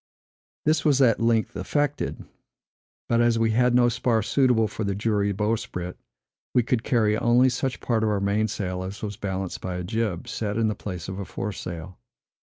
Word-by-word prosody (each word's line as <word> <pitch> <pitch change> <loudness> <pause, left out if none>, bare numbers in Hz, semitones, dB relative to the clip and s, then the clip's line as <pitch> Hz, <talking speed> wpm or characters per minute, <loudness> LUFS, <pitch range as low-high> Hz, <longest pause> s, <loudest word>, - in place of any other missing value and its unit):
This 155 +1 +2
was 145 -3 +3
at 120 -5 +4
length 115 -1 +1
effected; 145 -1 -1 0.8
but, 115 0 +3
as 120 -1 +3
we 115 0 +2
had 125 +2 +3
no 125 -1 +5
spar 120 -2 +1
suitable 125 -3 +3
for 105 - -7
a 100 -2 -1
jury 105 -1 +1
bowsprit, 100 -4 -2 0.6
we 125 - +5
could 125 -1 0
carry 110 -4 +2
only 120 +3 +4
such 125 +1 -2
part 115 -3 +1
of 110 - +2
our 105 -1 +1
mainsail 100 -2 -1
as 95 +3 -6
was 105 -1 -3
balanced 95 -2 -4
by 90 -1 -4
a 90 - -3
jib, 105 -2 -2
set 105 -1 -3
in 115 -1 +2
the - - 0
place 90 -5 -6
of 95 +1 -5
a 100 - -4
foresail. 90 -4 -6
110 Hz, 180 wpm, -25 LUFS, 100-120 Hz, 0.8 s, no